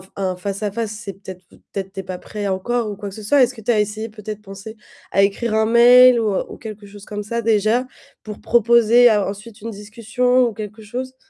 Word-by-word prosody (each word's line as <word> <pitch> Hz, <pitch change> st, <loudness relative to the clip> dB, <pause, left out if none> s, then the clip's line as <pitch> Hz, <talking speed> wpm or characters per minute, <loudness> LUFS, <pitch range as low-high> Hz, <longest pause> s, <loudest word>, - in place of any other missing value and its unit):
un 185 Hz, -2 st, -2 dB
face 195 Hz, +2 st, -5 dB
à 210 Hz, -2 st, -2 dB
face, 225 Hz, -1 st, -3 dB
c'est 210 Hz, -2 st, -7 dB
peut-être 190 Hz, -1 st, -11 dB, 0.3 s
peut-être 195 Hz, -1 st, -5 dB
tu 195 Hz, -, -8 dB
es -, -, -16 dB
pas 180 Hz, -1 st, -7 dB
prêt 210 Hz, -1 st, -6 dB
encore 215 Hz, +4 st, -1 dB
ou -, -, -6 dB
quoi 200 Hz, 0 st, -7 dB
que 195 Hz, -, -11 dB
ce 215 Hz, -, -9 dB
soit. 275 Hz, +6 st, +3 dB
Est-ce 250 Hz, +1 st, +2 dB
que 225 Hz, -, -11 dB
tu 230 Hz, +3 st, 0 dB
as 215 Hz, -, +2 dB
essayé 215 Hz, +2 st, -2 dB
peut-être 215 Hz, -1 st, -8 dB
penser 195 Hz, +3 st, -10 dB, 0.3 s
à 195 Hz, -, +3 dB
écrire 215 Hz, +3 st, 0 dB
un 220 Hz, 0 st, +3 dB
mail 245 Hz, +2 st, +7 dB
ou 210 Hz, -3 st, -2 dB
quelque 215 Hz, -2 st, -9 dB
chose 200 Hz, 0 st, -13 dB
comme 210 Hz, -1 st, -6 dB
ça 235 Hz, +3 st, -3 dB
déjà 225 Hz, +3 st, +1 dB, 0.3 s
pour 210 Hz, -1 st, -9 dB
proposer 235 Hz, +1 st, +5 dB
ensuite 205 Hz, +1 st, -3 dB
une 230 Hz, +1 st, -6 dB
discussion 230 Hz, +5 st, 0 dB
ou 230 Hz, -, -4 dB
quelque 215 Hz, +1 st, -8 dB
chose? 255 Hz, +4 st, -6 dB
215 Hz, 225 wpm, -20 LUFS, 200-235 Hz, 0.3 s, mail